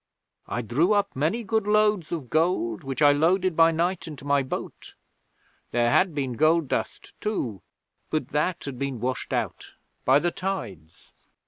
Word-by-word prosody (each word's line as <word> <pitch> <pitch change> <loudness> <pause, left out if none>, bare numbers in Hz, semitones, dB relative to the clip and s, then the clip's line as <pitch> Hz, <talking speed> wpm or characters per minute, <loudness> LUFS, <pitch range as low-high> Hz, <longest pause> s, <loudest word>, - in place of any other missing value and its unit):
I 120 +3 -3
drew 150 - +2
up 205 -1 0
many 160 - 0
good 220 0 0
loads 210 -5 +2
of 155 -8 -5
gold, 155 - +1
which 135 +2 -2
I 145 - +8
loaded 175 +4 +2
by 165 0 +6
night 170 +3 -1
into 145 -3 -9
my 140 0 +3
boat. 130 - -6 0.7
There 120 0 +2
had 180 +1 +3
been 135 -4 -2
gold 155 +3 +2
dust - - -3
too, 125 - -2 0.5
but 155 - -2
that 165 +4 -1
had 135 -3 -6
been 140 -3 -3
washed 130 +3 -3
out - - -3 0.3
by 130 +2 +5
the 175 +4 +1
tides.' 115 - -6
155 Hz, 160 wpm, -25 LUFS, 130-180 Hz, 0.7 s, I